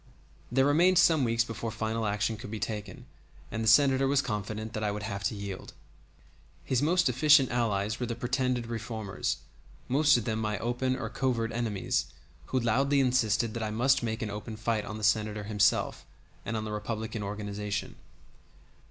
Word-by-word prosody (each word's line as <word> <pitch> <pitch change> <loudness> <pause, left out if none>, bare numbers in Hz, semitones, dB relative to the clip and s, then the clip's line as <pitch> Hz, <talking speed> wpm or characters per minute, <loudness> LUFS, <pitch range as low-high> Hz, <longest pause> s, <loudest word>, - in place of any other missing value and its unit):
There 135 +2 +3
remained 175 +6 +4
some 165 -4 +5
weeks 115 -1 +2
before 115 0 -5
final 110 0 -2
action 105 +2 0
could 105 - -9
be 110 0 -5
taken, 105 -4 -5 0.5
and 115 +1 -2
the - - -1
Senator 135 +3 +5
was 140 0 +3
confident 110 0 -4
that 110 - -3
I 105 - +1
would 105 0 -4
have 100 -2 -4
to - - 0
yield. 100 -2 -7 0.9
His 130 -1 0
most 170 +3 +3
efficient 135 +2 +5
allies 110 -3 0
were 125 - -2
the 115 - -3
pretended 125 0 -1
reformers, 115 -3 -3 0.5
most 145 +2 +4
of 115 - -3
them 110 -1 -1
my 105 -1 -1
open 125 +2 -1
or 130 - -4
covert 115 -4 0
enemies, 110 - -1 0.4
who 130 - 0
loudly 135 +5 +2
insisted 120 -4 +2
that 115 - -4
I 110 - -1
must 130 +5 +2
make 110 -1 -2
an 105 - -3
open 105 +2 -6
fight 110 -1 -1
on 110 - -6
the 110 - -8
Senator 105 -1 +1
himself 105 -1 +1 0.4
and 115 - -1
on 110 - -3
the 110 - -5
Republican 110 +1 -4
organization. 105 0 -4
115 Hz, 180 wpm, -29 LUFS, 105-125 Hz, 0.9 s, some